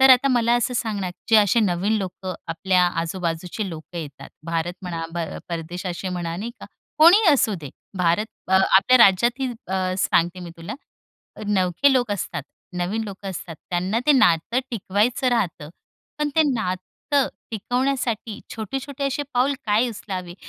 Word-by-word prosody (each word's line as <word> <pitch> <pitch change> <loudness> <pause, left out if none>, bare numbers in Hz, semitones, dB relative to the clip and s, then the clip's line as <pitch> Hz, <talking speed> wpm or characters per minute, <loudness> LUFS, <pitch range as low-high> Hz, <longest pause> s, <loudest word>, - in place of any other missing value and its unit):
तर 265 0 +8
आता 255 +2 +6
मला 240 -2 +3
असं 245 +1 -1
सांग 220 -3 -1
ना 185 -2 -2 0.2
जे 225 - +7
असे 215 +2 +4
नवीन 190 +1 +1
लोकं 185 -1 -5
आपल्या 180 +2 +2 0.2
आजूबाजूचे 175 +3 -3
लोकं 165 +1 -8
येतात. 145 -4 -8 0.2
भारत 165 +1 -1
म्हणा 170 -3 -4
प - - -2 0.3
परदेश 170 +2 -5
असे 180 +1 -3
म्हणा 175 -2 -3
नाही 220 +5 -4
का? - - -9 0.3
कोणीही 360 +7 +7
असू 235 -6 +2
दे. 145 - -8 0.3
भारत 180 +4 +2 0.2
आपल्या 190 +5 +5
राज्यातही 235 +6 +4 0.2
आ, 185 -1 0
सांगते 175 0 +1
मी 175 -1 -7
तुला 165 +5 -6 0.7
नवखे 190 +6 +3
लोक 245 -4 +1
असतात, 200 - -3 0.3
नवीन 185 +6 -1
लोक 200 -1 -8
असतात 175 -3 -6
त्यांना 185 +5 0
ते 300 - +7
नातं 230 - +3
टिकवायचं 230 +3 0
राहतं. 190 -10 -1 0.5
पण 300 0 +1
ते 320 - +7
नातं 220 +6 -1 0.2
टिकवण्यासाठी 240 -1 -1
छोटे-छोटे 270 +6 -4
असे 275 +2 -1
पाऊल 260 +3 +3
काय 215 +4 +3
उचलावे 185 -5 -6
195 Hz, 150 wpm, -23 LUFS, 175-240 Hz, 0.7 s, तर